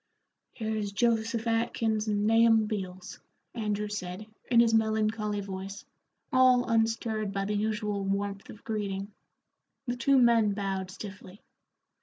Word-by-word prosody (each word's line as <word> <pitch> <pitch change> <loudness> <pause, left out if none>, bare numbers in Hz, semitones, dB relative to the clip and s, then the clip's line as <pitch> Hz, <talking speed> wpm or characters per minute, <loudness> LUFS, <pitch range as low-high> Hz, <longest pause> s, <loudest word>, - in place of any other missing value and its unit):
"Here's 220 -3 -3
Joseph 230 +1 0
Atkins 225 -1 0
and 205 -1 0
Nahum 225 0 +5
Beals," 185 -4 -5 0.3
Andrew 210 -2 -2
said, 195 -1 -5 0.2
in 235 -2 +5
his 230 -1 +5
melancholy 215 -1 +1
voice, 195 +1 -7 0.5
all 255 -1 +5
unstirred 225 -2 0
by 195 0 -2
the 210 - -2
usual 210 -1 -1
warmth 200 0 -3
of 215 - -12
greeting. 200 -2 -3 0.7
The 245 -1 -2
two 275 +3 +3
men 230 -4 +4
bowed 195 -2 -3
stiffly. 195 0 -10
215 Hz, 125 wpm, -29 LUFS, 200-225 Hz, 0.7 s, Nahum